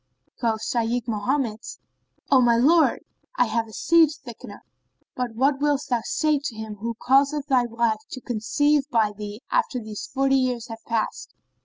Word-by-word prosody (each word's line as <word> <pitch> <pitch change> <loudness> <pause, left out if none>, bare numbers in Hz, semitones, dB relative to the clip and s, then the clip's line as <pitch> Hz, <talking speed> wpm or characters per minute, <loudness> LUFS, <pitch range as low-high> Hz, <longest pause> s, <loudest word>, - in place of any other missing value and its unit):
Quoth 225 -3 -1
Shaykh 235 0 -1
Mohammed, 230 +1 -1 0.7
"O 265 -2 +6
my 235 -1 +4
lord, 315 +7 +4 0.4
I - - +4
have 225 0 -1
a - - -13
seed 330 +6 +4 0.2
thickener, 220 -4 -10 0.5
but 245 -3 -3
what 270 +3 +2
wilt 290 -1 +1
thou 240 -2 +2
say 305 -2 +1
to 265 -6 -4
him 215 -1 -7
who 230 +3 -4
causeth 275 +4 +2
thy 255 -4 +2
wife 230 -2 0
to 260 - -7
conceive 275 +5 0
by 225 -5 +2
thee 210 +2 -8
after 465 - +1
these 215 -2 -7
forty 270 0 +2
years 250 -2 -1
have 225 0 -9
passed?" 225 - -3
240 Hz, 165 wpm, -24 LUFS, 225-275 Hz, 0.7 s, O